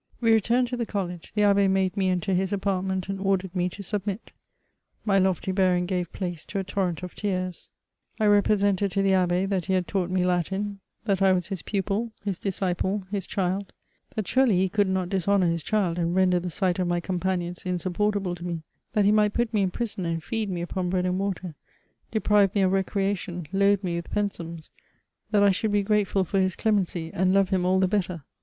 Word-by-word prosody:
We 230 -1 +3
returned 235 +3 +3
to 250 - -3
the 235 -2 -2
college; 180 -4 -4
the 210 - +3
Abb^ 200 -1 +4
made 190 -1 +1
mie 195 -2 +1
enter 185 +1 0
his 185 +1 0
apartment, 190 -2 -1
and 195 0 -3
ordered 195 -1 0
me 180 0 +1
to 200 +3 -9
submit. 205 +1 -3 0.7
My 195 -2 +3
lofty 190 0 +1
bearing 185 -2 +2
gave 180 -2 -2
{dace 175 -4 -4
to 205 - -5
a 195 - 0
torrent 185 -2 -2
of 180 - -6
tears. 185 -3 -3 0.5
I 215 - +2
represented 205 -1 +3
to 195 - +1
the 195 - +3
Abb^ 185 0 +2
that 190 -3 0
he 190 - 0
hfld 180 -1 +1
taught 185 -2 -1
me 185 0 +1
Latin; 190 +3 -1 0.3
that 200 -3 +1
I 190 -1 +5
was 180 -2 -1
his 190 -3 -3
pu{»i, 205 +3 -1
his 200 -3 -2
disciple, 190 +1 -1
his 200 -3 -2
^hild; 190 +1 -1 0.5
^at 215 - -1
surely 255 -5 +3
he 190 +1 +2
could 205 0 +2
not 185 -1 -1
dishonour 195 0 +2
his 170 -1 0
child, 185 -3 0
and 170 +1 0
render 185 -1 +3
the 180 +1 -4
sight 180 +1 0
of 180 - +1
my 175 0 +1
companions 180 -1 -2
insupportable 185 +2 -1
to 175 -1 -8
me; 170 -2 -4 0.3
that 210 -2 +3
he 205 - +5
might 210 -1 +3
put 240 -1 0
me 210 - +2
in 190 - +2
prison 205 -3 -3
and 165 -1 -2
feed 220 0 -2
me 175 -2 -3
upon 180 0 -2
bread 180 0 0
and 185 +1 0
water, 190 -3 -3 0.6
deprive 210 -3 +3
me 200 - +3
of 185 - +3
recreation, 195 -2 -1
load 200 0 +3
me 175 -2 -1
with 170 - -6
pen^ums 170 -6 -4 0.3
;" - - -51
that 205 -1 +3
I 200 - +6
should 210 +3 -1
be 205 0 +2
grat^ul 200 -2 +1
for 195 +3 0
his 185 -1 +1
demency, 185 -6 0
and 185 +1 +2
love 195 -1 +3
him 180 -2 +1
all 185 +1 +3
the 190 - +3
better. 180 -5 -1
190 Hz, 215 wpm, -26 LUFS, 180-200 Hz, 0.7 s, I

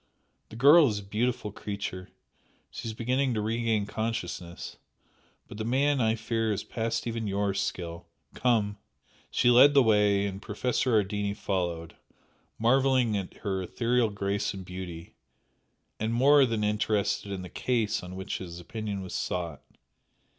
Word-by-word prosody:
The - - -11
girl 145 +6 +7
is 105 -4 -1
a 100 - -6
beautiful 110 +2 -1
creature 100 -2 -5 0.6
she - - -6
is 110 - -3
beginning 125 +2 0
to 105 - 0
regain 110 -1 0
consciousness 105 -6 -4 0.7
but 105 - -10
the - - -1
man 135 +4 +2
I 110 -1 +2
fear 115 0 -1
is 100 - -2
past 115 -1 -2
even 115 -2 -3
YOUR 100 0 0
skill. 90 -3 -4 0.3
Come!" 105 -5 +1 0.5
She 120 - +3
led 140 +4 +7
the 140 - +7
way 105 -3 +3
and 100 0 -4
Professor 125 +3 -1
Ardini 100 0 -2
followed, 85 -5 -3 0.6
marvelling 130 -1 +3
at 95 -2 -3
her 95 -2 -1
ethereal 120 +4 +1
grace 100 0 -2
and 95 -1 -8
beauty, 90 -2 -8 0.9
and 110 +1 -1
more 135 +3 +5
than 115 -2 -1
interested 105 -1 0
in 95 -2 -4
the 90 - -8
"case" 115 +1 0
on 90 +1 -8
which 95 0 -4
his 85 -2 -8
opinion 100 +1 -5
was 95 - -8
sought. 85 -5 -3
105 Hz, 150 wpm, -28 LUFS, 95-115 Hz, 0.9 s, girl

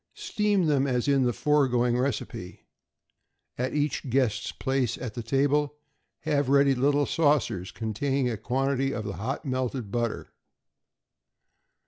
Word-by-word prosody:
= - - -47
Steam 205 -4 0
them 140 -3 +2
as 125 -1 0
in 140 -2 +3
the 120 - +2
foregoing 125 -4 +2
recipe. 125 -2 -3 0.9
At 130 +3 -2
each 145 -2 -1
guest's 115 -4 +1
place 130 -4 -1
at 120 -4 -6
table 145 +3 +1 0.5
have 145 -3 0
ready 140 0 +5
little 140 +3 +2
saucers 145 - +1
containing 125 +5 -1
a 120 - -1
quantity 135 +4 0
of 110 - -3
the 100 -5 -5
hot 130 - -4
melted 130 -4 -2
butter. 120 -1 -2
135 Hz, 130 wpm, -27 LUFS, 120-145 Hz, 0.9 s, ready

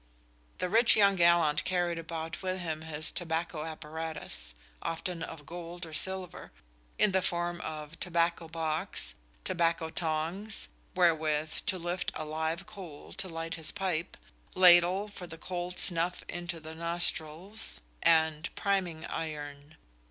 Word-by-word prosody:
The 180 - 0
rich 225 +5 +7
young 200 -2 +6
gallant 170 -4 +5
carried 175 -2 +1
about 165 0 -5
with 185 0 -1
him 160 -3 -3
his 155 -1 -2
tobacco 165 -2 -2
apparatus 160 - -6 0.3
(often 165 +1 -3
of 155 -2 -6
gold 175 +1 -7
or 160 - -10
silver) 190 +2 -2 0.5
in 210 - +5
the 190 0 +3
form 175 -1 0
of 155 0 -6
tobacco 170 -1 +1
box, 155 - -1 0.3
tobacco 165 -2 +1
tongs 165 +7 -1 0.3
wherewith 160 -3 +3
to 190 - +2
lift 175 +1 -2
a 155 - -3
live 160 +4 -2
coal 190 -8 -9
to 190 - -3
light 165 0 -4
his 160 -2 +1
pipe, 185 -5 -2 0.4
ladle 180 +2 +7
"for 195 -3 -8
the 165 -1 -8
cold 180 +1 -4
snuffe 175 0 0
into 175 -1 -4
the 160 0 -8
nosthrill," 170 +2 -1 0.5
and 160 0 +4
priming 180 -5 0
iron. 145 -1 -5
170 Hz, 135 wpm, -31 LUFS, 160-180 Hz, 0.5 s, rich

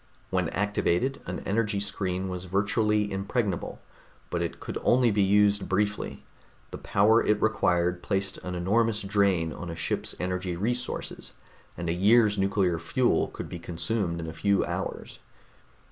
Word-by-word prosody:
When - - +1
activated, 105 +5 0
an 90 - -4
energy 105 0 0
screen 95 -2 -2
was 90 0 -5
virtually 105 +2 +1
impregnable, 100 0 -2 0.5
but - - -1
it - - -3
could - - -5
only 125 -1 +4
be 100 0 +2
used 100 +1 +3
briefly; 100 +2 -1 0.5
the - - -7
power 110 +4 +3
it 105 - +2
required 90 -5 +1
placed 95 -1 -2
an 90 0 -5
enormous 105 +5 +1
drain 95 -5 +1
on 90 - -7
a 85 - -5
ship's 80 -2 -2
energy 90 0 -2
resources, 120 +7 -3 0.4
and 85 +1 -4
a 85 - +1
year's 105 +3 +4
nuclear 95 -3 +1
fuel 120 +9 +1
could - - -7
be 85 - -7
consumed 85 +1 -2
in 85 - -4
a 80 - -6
few 100 +5 +1
hours. - - -5
100 Hz, 150 wpm, -27 LUFS, 90-105 Hz, 0.5 s, only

